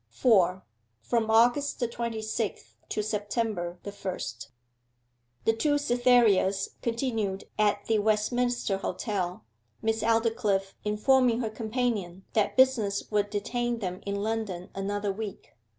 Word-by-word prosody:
4. 185 Hz, -, +3 dB, 0.4 s
FROM 225 Hz, -, 0 dB
AUGUST 240 Hz, +6 st, +3 dB
THE 240 Hz, -, +1 dB
TWENTY 235 Hz, -1 st, -4 dB
SIXTH 220 Hz, -1 st, -3 dB
TO 210 Hz, -, -1 dB
SEPTEMBER 205 Hz, -4 st, -2 dB
THE 200 Hz, -, -5 dB
FIRST 140 Hz, -, -5 dB, 1.0 s
The 225 Hz, -, +4 dB
two 290 Hz, +6 st, +2 dB
Cythereas 240 Hz, -7 st, +3 dB
continued 225 Hz, -5 st, -1 dB, 0.2 s
at 205 Hz, -1 st, +2 dB
the 220 Hz, -1 st, +2 dB
Westminster 215 Hz, 0 st, +1 dB
Hotel, 185 Hz, -, -3 dB, 0.4 s
Miss 225 Hz, 0 st, +1 dB
Aldclyffe 225 Hz, -4 st, +1 dB
informing 235 Hz, +3 st, +3 dB
her 220 Hz, -2 st, -2 dB
companion 215 Hz, -5 st, -2 dB
that 215 Hz, +2 st, +1 dB
business 225 Hz, -8 st, +3 dB
would 205 Hz, -1 st, +1 dB
detain 240 Hz, +4 st, -1 dB
them 185 Hz, -4 st, -4 dB
in 200 Hz, 0 st, -3 dB
London 215 Hz, -5 st, -3 dB
another 200 Hz, +1 st, -2 dB
week. 205 Hz, -1 st, -7 dB
215 Hz, 120 wpm, -28 LUFS, 200-235 Hz, 1.0 s, The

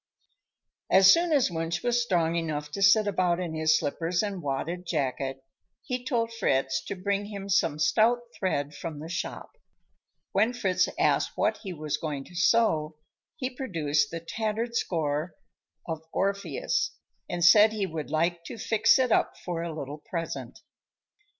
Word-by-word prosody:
As 190 Hz, 0 st, +8 dB
soon 340 Hz, 0 st, +1 dB
as 275 Hz, -, +3 dB
Wunsch 165 Hz, 0 st, -2 dB
was 240 Hz, 0 st, +2 dB
strong 170 Hz, -7 st, +1 dB
enough 150 Hz, -3 st, -3 dB
to 200 Hz, -, -5 dB
sit 200 Hz, +2 st, +6 dB
about 180 Hz, -3 st, +1 dB
in 175 Hz, -3 st, -3 dB
his 160 Hz, 0 st, +3 dB
slippers 165 Hz, +5 st, -1 dB
and 200 Hz, -3 st, -3 dB
wadded 155 Hz, +5 st, -3 dB
jacket, 135 Hz, -3 st, -2 dB, 0.4 s
he 250 Hz, -3 st, -3 dB
told 230 Hz, -3 st, -1 dB
Fritz 135 Hz, -10 st, 0 dB
to -, -, -4 dB
bring 200 Hz, +2 st, -1 dB
him 200 Hz, -1 st, -7 dB
some 165 Hz, -6 st, +2 dB
stout 225 Hz, +9 st, +3 dB
thread 145 Hz, -6 st, -2 dB
from 160 Hz, 0 st, -6 dB
the 155 Hz, +2 st, -8 dB
shop. 170 Hz, -, -5 dB, 0.8 s
When 215 Hz, +5 st, +2 dB
Fritz 190 Hz, -7 st, +1 dB
asked -, -, +2 dB
what -, -, +1 dB
he 195 Hz, -, -7 dB
was 155 Hz, -3 st, -3 dB
going 145 Hz, -4 st, -4 dB
to 175 Hz, -, -16 dB
sew, 170 Hz, -6 st, +2 dB, 0.4 s
he 265 Hz, -4 st, -3 dB
produced 150 Hz, -, 0 dB
the 165 Hz, -, -5 dB
tattered 220 Hz, +6 st, -3 dB
score 155 Hz, -4 st, -1 dB, 0.5 s
of 160 Hz, -2 st, -4 dB
"Orpheus" 200 Hz, -, -1 dB, 0.3 s
and 175 Hz, -1 st, 0 dB
said 210 Hz, +5 st, +8 dB
he 210 Hz, -2 st, -1 dB
would 160 Hz, -4 st, -5 dB
like 170 Hz, +2 st, 0 dB
to -, -, -7 dB
fix 220 Hz, +3 st, +3 dB
it 255 Hz, -2 st, +1 dB
up -, -, +2 dB
for 175 Hz, -2 st, -2 dB
a 170 Hz, 0 st, -3 dB
little 150 Hz, -1 st, -6 dB
present. 165 Hz, +2 st, -6 dB
175 Hz, 160 wpm, -27 LUFS, 155-215 Hz, 0.8 s, As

